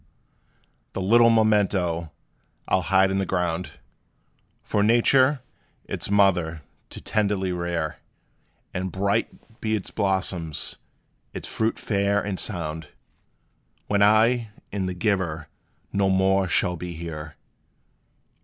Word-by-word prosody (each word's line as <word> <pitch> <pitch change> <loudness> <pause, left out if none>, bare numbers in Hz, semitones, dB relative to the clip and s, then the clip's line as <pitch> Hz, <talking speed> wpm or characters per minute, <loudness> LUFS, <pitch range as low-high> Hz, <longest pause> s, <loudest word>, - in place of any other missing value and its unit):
The - - -3
little 115 +5 +5
memento 100 -7 +2 0.6
I - - -4
'll - - -1
hide 95 +1 +3
in 95 - 0
the - - +1
ground, 90 -1 -2 0.9
For 105 - 0
Nature, 130 +5 +4 0.4
its - - -4
mother, 90 -6 +2 0.3
to - - -9
tenderly 100 -3 0
rear; 85 -3 -2 0.8
And 90 0 -3
bright 100 +3 -2
be 110 0 0
its 105 - -5
blossoms 90 -5 -2 0.6
its - - -4
fruit 110 +1 -1
fair 100 -1 +1
and 100 -2 -3
sound, 80 -5 -4 1.0
When 100 -1 +1
I 110 +3 +4 0.2
and 95 -2 -2
the 90 - -4
giver 90 -5 -1 0.5
no 100 -1 +2
more 95 0 +3
shall 90 +1 +1
be 90 +1 -6
here! 80 -2 -7
95 Hz, 115 wpm, -24 LUFS, 90-105 Hz, 1.0 s, little